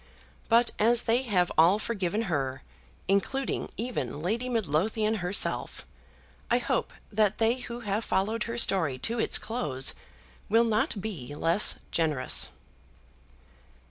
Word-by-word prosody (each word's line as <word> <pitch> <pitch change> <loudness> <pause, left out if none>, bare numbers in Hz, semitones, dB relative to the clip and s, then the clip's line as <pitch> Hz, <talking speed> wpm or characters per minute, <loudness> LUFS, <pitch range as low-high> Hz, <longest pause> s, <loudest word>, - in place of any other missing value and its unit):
But 235 +1 +4
as 235 +2 +4
they 235 +2 +1
have 190 -8 0
all 175 +5 +5
forgiven 210 -1 -2
her, 140 -9 -3 0.4
including 205 +7 -1
even 220 - -4
Lady 225 +10 -2
Midlothian 215 +1 0
herself, 180 +1 0 0.6
I 240 - +3
hope 245 - -2 0.2
that 210 -1 +1
they 230 +2 +1
who 240 -1 -7
have 210 0 -2
followed 210 +3 -1
her 230 0 -5
story 165 - +2
to 230 - -2
its - - +4
close 150 - 0 0.6
will 225 +3 +4
not 220 -2 0
be 150 - -6
less 165 +7 +4 0.2
generous. 150 - +2
210 Hz, 125 wpm, -27 LUFS, 175-230 Hz, 0.6 s, all